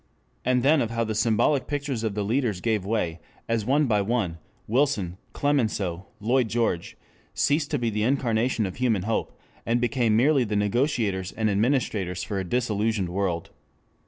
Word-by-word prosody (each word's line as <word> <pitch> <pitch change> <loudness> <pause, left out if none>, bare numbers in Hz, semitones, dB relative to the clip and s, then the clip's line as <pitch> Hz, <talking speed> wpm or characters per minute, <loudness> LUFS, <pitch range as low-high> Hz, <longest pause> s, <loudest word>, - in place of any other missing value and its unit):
And 125 0 +2
then 145 +1 +4
of 115 - -1
how 115 0 -1
the 110 -1 -2
symbolic 115 +5 +2
pictures 140 -5 -2
of 110 -3 -1
the 105 - -1
leaders 110 -2 0
gave 110 -1 0
way, 90 -7 -1 0.3
as 115 -2 0
one 145 +3 +3
by 105 -5 +2
one, 100 -6 -1 0.3
Wilson, 110 -8 0
Clemenceau, 105 -11 0
Lloyd 120 +3 +2
George, 110 -6 -1 0.4
ceased 145 +1 +1
to 145 - 0
be 120 -3 -1
the 105 0 -1
incarnation 120 -2 +1
of 95 - -5
human 115 -7 +1
hope, 110 +2 -2 0.2
and 115 +1 +1
became 120 -2 +1
merely 135 +2 +4
the 105 -2 -2
negotiators 105 - 0
and 110 -1 0
administrators 100 -5 0
for 100 -2 -3
a - - -2
disillusioned 105 -2 0
world. 90 -2 -2
115 Hz, 165 wpm, -25 LUFS, 100-125 Hz, 0.4 s, then